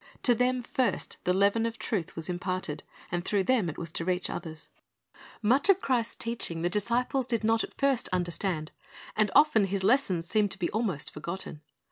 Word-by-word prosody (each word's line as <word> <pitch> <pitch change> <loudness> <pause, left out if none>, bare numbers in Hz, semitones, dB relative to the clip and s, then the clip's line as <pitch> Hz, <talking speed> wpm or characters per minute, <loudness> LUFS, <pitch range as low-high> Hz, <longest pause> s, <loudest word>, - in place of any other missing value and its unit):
To 245 - +5
them 250 +1 +1
first 255 +1 -1
the 180 - +3
leaven 200 +4 +3
of 230 0 -6
truth 190 -8 -3
was 165 -1 -5
imparted, 180 -4 -3 0.3
and 175 0 -1
through 200 +1 +1
them 225 -6 +2
it 155 - -7
was 165 -2 -5
to 165 - -3
reach 180 +1 -1
others. 160 -2 -7 0.7
Much 260 - +3
of 390 -1 +6
Christ's 240 -8 0
teaching 225 -8 -3
the 175 - +1
disciples 240 +5 +1
did 230 -3 0
not 225 +1 +3
at - - -8
first 275 -3 +1
understand, 175 -2 -2 0.4
and 215 -1 +3
often 290 -8 +6
His 195 0 -2
lessons 190 -8 +2
seemed 210 +1 +2
to 195 - -5
be 175 - -1
almost 200 -9 -2
forgotten. 165 0 -6
200 Hz, 185 wpm, -29 LUFS, 175-235 Hz, 0.7 s, of